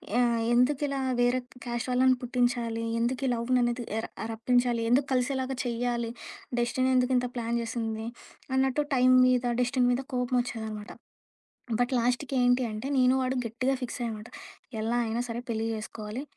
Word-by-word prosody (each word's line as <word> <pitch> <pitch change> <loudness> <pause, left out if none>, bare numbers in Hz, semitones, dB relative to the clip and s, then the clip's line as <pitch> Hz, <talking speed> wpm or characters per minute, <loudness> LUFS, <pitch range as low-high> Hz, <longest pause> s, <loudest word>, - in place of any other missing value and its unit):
Yeah! 240 -1 +3 0.2
ఎందుకిలా, 275 +2 +2 0.2
వేరే 245 +1 +3 0.3
caste 240 +1 -3
వాళ్ళని 255 +1 +4
పుట్టించాలి? 240 -2 0 0.2
ఎందుకు 250 +3 0
ఈ - - +2
లవ్‌ని 245 +2 +1
అనేది 240 0 -1
ఎర 225 - -2 0.3
రప్పించాలి. 240 +1 +1
ఎందుకు 265 +3 +3
కలిసేలాగా 260 +1 0
చెయ్యాలి, 235 -1 -1 0.5
డెస్టిని 255 +2 +1
ఎందుకింత 250 0 +2
ప్లాన్ 235 0 -1
జేసింది? 225 -1 -3 0.5
అన్నట్టు 265 +2 +2
టైం 255 0 +5 0.2
మీద, 250 -1 +3 0.2
డెస్టిని 250 0 +2
మీద 255 +2 -1
కోపమోచ్చేదనమాట. 240 -4 -2 0.9
బట్ 245 +1 +1
లాస్ట్‌కి 250 +3 0
ఏంటి 245 +1 +4
అంటే, 215 +5 -5
నేను, 255 0 +5
వాడు 255 +1 -1
గట్టిగా 255 +4 0
ఫిక్సయ్యామట. 230 -3 -4 0.5
ఎలా 225 +2 0
అయినా 225 +2 -1
సరే, 230 +1 -3
పెళ్లి 225 -1 -1
జేసుకోవాలి. 215 +3 -6
245 Hz, 140 wpm, -28 LUFS, 230-255 Hz, 0.9 s, టైం